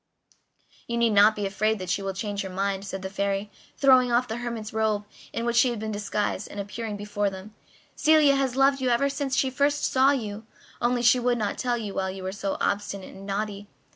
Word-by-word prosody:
"You 235 - -2
need 235 -1 +3
not 210 +1 +6
be 205 - -2
afraid 215 +3 0
that 185 -2 -4
she - - 0
will 195 -1 -3
change 205 0 -3
her 190 - -5
mind," 195 +1 -2
said 190 -1 -6
the 190 - -4
Fairy, 200 +1 -2 0.3
throwing 255 -3 +5
off 245 +1 +2
the 225 - -4
hermit's 230 -3 -5
robe 215 -2 0 0.3
in 230 - -3
which 235 0 0
she 250 - +5
had 240 - -3
been 215 0 -4
disguised 205 -1 -2
and 205 - -7
appearing 210 +1 -5
before 205 0 -1
them. 195 +2 -10 0.4
"Celia 305 -3 +5
has 270 -2 0
loved 270 0 +3
you 255 - +1
ever 245 +4 +2
since 280 -1 -2
she 265 - +2
first 285 +2 +1
saw 265 +1 +4
you, 220 -5 -2 0.3
only 240 0 +1
she 245 +1 +5
would 245 0 +1
not 215 -3 -2
tell 245 -2 0
you 210 -4 -5
while 190 0 -1
you 190 0 -7
were 185 - -3
so 195 0 -3
obstinate 200 -1 -2
and 195 +1 -11
naughty. 205 0 -3
215 Hz, 225 wpm, -26 LUFS, 200-245 Hz, 0.4 s, not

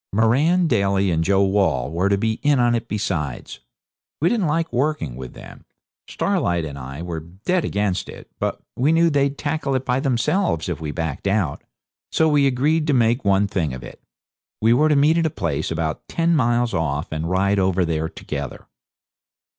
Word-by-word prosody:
Moran, 135 - +3
Daly, 100 - +2
and 80 0 +1
Joe 100 +3 +3
Wall 95 -8 +1
were 90 +4 +1
to 100 - +2
be 110 +2 -1
in 145 -2 +3
it 115 0 -2
besides. 85 - -3 0.6
We 165 - +3
didn't 215 -8 +1
like 165 +2 -1
working 130 - -1
with 65 -1 -9
them. - - -12 0.4
Starlight 85 -2 0
and 75 -2 -6
I 70 +3 -7
were 85 -2 -4
dead 95 - -2
against 100 -5 -1
it. - - -11
But - - -2 0.2
we 140 +5 +2
knew 165 0 +4
they'd 140 -1 +1
tackle 145 -2 -2
it 130 0 -2
by 125 +1 +1
themselves 135 - 0
if - - -4
we 75 - -4
backed 80 +2 -3
out. 95 -7 0 0.5
So 160 - +3
we 145 -2 +4
agreed 150 +5 +1
to 150 - +2
make 120 0 +2
one 100 0 +3
thing 85 -9 -2
of 65 - -9
it. - - -11 0.6
We 115 +2 +4
were 150 +5 +3
to 150 - +3
meet 150 +4 +4
at 165 - +2
a - - -1
place 80 - -2
about 80 -1 -3
ten 170 0 +1
miles 120 -3 +1
off 75 +1 -2
and 80 +1 -3
ride 100 +2 +2
over 95 -1 +2
there 80 -1 -1
together. 70 -3 -6
100 Hz, 185 wpm, -22 LUFS, -, 0.6 s, knew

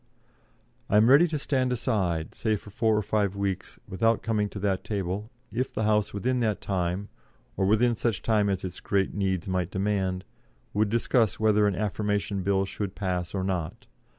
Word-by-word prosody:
"I 105 - +4
am 110 +4 +6
ready 155 +6 +7
to 155 -2 -2
stand 130 -3 0
aside, 90 -9 -1
say 110 -1 0
for 105 0 -9
four 110 +1 +2
or 105 - 0
five 100 -1 0
weeks, 100 -2 -3
without 115 +4 +1
coming 105 -2 0
to - - -8
that 95 -2 -1
table, 100 +1 -3 0.2
if 125 +3 -2
the 110 - 0
House 105 -1 +2
within 125 +5 0
that 110 -4 0
time, 95 +1 -2 0.5
or 95 -1 +1
within 115 +3 +3
such 110 -3 -1
time 105 -3 +2
as 95 -2 -1
its 90 - -6
great 100 -1 0
needs 95 -3 -1
might 90 -2 -1
demand, 95 -1 -1 0.5
would 105 0 +2
discuss 115 0 +2
whether 105 -1 +4
an 100 - 0
Affirmation 105 0 -1
Bill 95 +1 +1
should 100 0 -5
pass 90 -2 -2
or 95 - -1
not. 90 -4 -3
100 Hz, 180 wpm, -27 LUFS, 95-110 Hz, 0.5 s, ready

